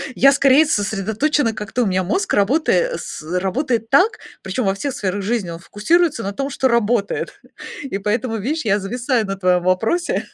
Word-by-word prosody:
Я 275 +1 +6
скорее 275 +2 +5
сосредоточена 220 +4 0
как-то, 220 +3 -2
у - - 0
меня 185 -1 0
мозг, 375 - -1
работая 315 - +2
с - - -7 0.2
работает 225 +3 -1
так, 370 +11 +4 0.2
причем 195 +4 -3
во 195 - +2
всех 275 +6 -4
сферах 195 0 -2
жизни, 205 -3 -2
он 165 - -7
фокусируется 305 - +1
на 200 +1 -3
том, 275 +5 -3
что 265 - 0
работает. 235 -3 0 0.4
И 260 -8 -4
поэтому, 225 +3 -1
вишь, 280 +6 -3
я 205 0 +2
зависаю 235 +3 -1
на 195 - -3
твоем 180 -2 +1
вопросе. 220 - 0
225 Hz, 175 wpm, -19 LUFS, 195-275 Hz, 0.4 s, Я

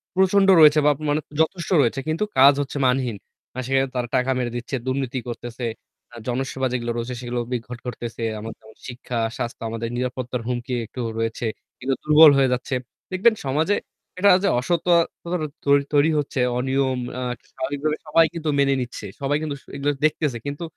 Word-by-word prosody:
প্রচন্ড 190 +1 +4
রয়েছে 150 0 +8
বা 150 - +6 0.2
মানে 150 +1 +1 0.2
যথেষ্ট 170 +2 -1
রয়েছে। 120 +2 +1
কিন্তু 160 +6 0 0.2
কাজ 140 +2 +9
হচ্ছে 145 +1 -4
মানহীন। 125 -4 0 0.4
মানে 130 - -4
সেখানে 135 0 +2
তারা 125 -1 -1
টাকা 130 +1 +2
মেরে 120 -2 -2
দিচ্ছে, 120 +3 -4
দুর্নীতি 130 0 -1
করতেছে, 120 0 -6 0.5
আ - - -11
জনসেবা 130 +1 -1
যেগুলো 120 -1 -2
রয়েছে, 120 +2 -3
সেগুলো 120 0 -3
বিদঘট 120 0 -4
করতেছে। 120 -1 -6 0.2
এমন 110 +1 -6
যেমন 110 0 -17
শিক্ষা, 125 -1 -5 0.2
স্বাস্থ্য, 120 -2 -4
আমাদের 115 +1 -4
নিরাপত্তার 125 -1 -3
হুমকি 125 +1 -3
একটু 125 +3 -7 0.2
রয়েছে। 115 +1 -2 0.3
কিংবা 130 +1 -1
দুর্বল 150 0 +8
হয়ে 135 -1 +4
যাচ্ছে, 125 +1 -2 0.4
দেখবেন 200 +5 +4
সমাজে 155 +9 +1 0.4
এটা 200 +2 +6
যে - - +3
অসত-ততা 170 +3 +1 0.3
তৈরি 140 0 +4
তৈরি 145 +2 +4
হচ্ছে। 140 -2 -3 0.2
অনিয়ম 130 0 0 0.2
আ - - -4 0.3
স্বাভাবিকভাবে 145 +3 -2
সবাই 165 +2 +5
কিন্তু 160 -2 -3
মেনে 140 0 +4
নিচ্ছে। 120 -3 -6 0.2
সবাই 140 +1 +1
কিন্তু 150 -2 -3
স - - -28
এগুলো 140 +1 0
দেখতেছে। 150 -4 0
কিন্তু 145 +4 -4
135 Hz, 170 wpm, -23 LUFS, 125-150 Hz, 0.5 s, কাজ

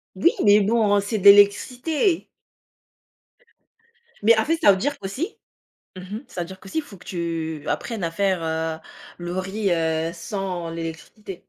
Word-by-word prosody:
Oui, 190 - +4
mais 205 0 +6
bon, 205 -1 +3
c'est 215 +2 -2
de 195 - -6
l'électricité. 250 - +4 2.0
Mais, 225 +2 +6
en 220 - +2
fait, 325 +2 +1
ça 200 - +7
veut 190 - 0
dire 285 +6 -2
qu'aussi 255 - -5 0.6
mmh - - -7 0.2
mh, 235 - -9
ça 175 - -7
veut 170 - -3
dire 190 +1 -11
qu'aussi, 195 +12 -3
faut 285 -10 -13
que 180 - -17
tu 165 -3 -4
apprennes 225 -4 -3
à 165 - -1
faire, 185 0 0
heu, 160 0 -2 0.4
le 175 +1 -4
riz, 195 +1 -2
heu, 160 -1 0
sans 185 -5 -4
l'électricité. 165 +4 -8
195 Hz, 160 wpm, -23 LUFS, 170-215 Hz, 2.0 s, ça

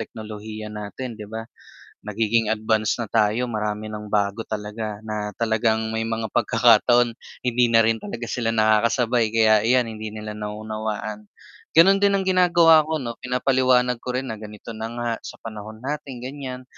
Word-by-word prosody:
teknolohiya 110 0 -7
natin 110 +3 -7
'di 105 - -8
ba, 110 +1 -6 0.6
nagiging 110 +1 0
advance 110 0 0
na 115 - -2
tayo 110 +3 +1
marami 105 -2 -3
nang 105 -1 -7
bago 100 +1 0
talaga 105 0 -5
na 105 -1 -3
talagang 110 -1 +1 0.2
may 110 - -1
mga 115 0 -2
pagkakataon 120 +1 +4 0.3
hindi 120 0 +3
na 115 -1 +5
rin 115 -1 0
talaga 120 0 -5
sila 115 -1 -1
nakakasabay 115 +1 +2
kaya 110 -1 +4
iyan 125 +2 +3
hindi 110 0 -6
nila 105 0 -7
nauunawaan, 105 0 -5 0.4
ganun 190 +5 +7
din 200 0 +3
ang 195 - +1
ginagawa 175 -4 +5
ko 160 0 -1
'no, 120 -2 -4
pinapaliwanag 125 -1 +2
ko 125 - -4
rin 130 +1 -2
na 110 - -5
ganito 105 +1 -10
na 110 +1 -5
nga 120 0 -2 0.2
sa - - -7
panahon 110 0 -8
natin 140 -3 -5
ganiyan, 130 -1 -6
110 Hz, 160 wpm, -23 LUFS, 110-125 Hz, 0.6 s, ganun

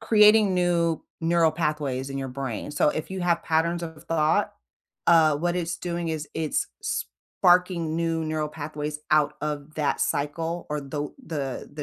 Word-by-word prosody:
creating 210 -2 +6
new 170 -2 +1 0.2
neural 165 0 +3
pathways 150 -5 -1
in 135 - -4
your 135 -1 -3
brain, 130 -1 -4
so 150 0 +2
if 155 +3 -4
you 190 0 -4
have 170 -1 +1
patterns 170 +2 +1
of 160 -1 -8
thought, 165 +5 +1 0.5
uh, 160 -3 +6
what 175 +3 0
it's 170 -1 -2
doing 170 -1 -3
is, 155 -2 -3
it's 155 -2 0 0.2
sparking 175 -3 +1
new 165 -1 0
neural 155 -1 -1
pathways 150 0 -5
out 150 -1 +3
of 150 0 -4
that 150 -2 0
cycle 165 +4 -1
or 150 0 -1
tho 145 +1 -5
the 140 -5 -4
the - - -22
160 Hz, 160 wpm, -26 LUFS, 150-170 Hz, 0.5 s, creating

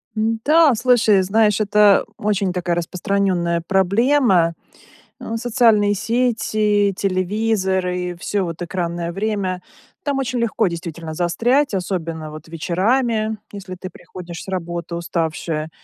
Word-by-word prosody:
М-да, 235 +7 +3
слушай, 225 -4 +4
знаешь, 210 +1 +2
это 210 -1 +4
очень 200 -3 0
такая 175 -1 -1
распространенная 175 -1 0
проблема. 195 -2 +3 0.7
Э, 225 - -5
социальные 225 -4 +3
сети, 215 -3 +1
телевизоры- 185 -2 -1
всё, 200 +1 -1
вот, 165 +1 -6
экранное 170 -1 -3
время. 195 -2 -2 0.4
Там 280 -2 -1
очень 255 -2 -2
легко 225 -2 +1
действительно 170 -1 -6
застрять, 235 - +1
особенно, 165 -4 -3
вот, 155 +1 -10
вечерами, 215 +7 0
если 195 -2 -8
ты 185 +1 -8
приходишь 175 -2 -10
с - - -15
работы 175 -2 -4
уставшая. 165 -2 -2
195 Hz, 115 wpm, -20 LUFS, 175-220 Hz, 0.7 s, слушай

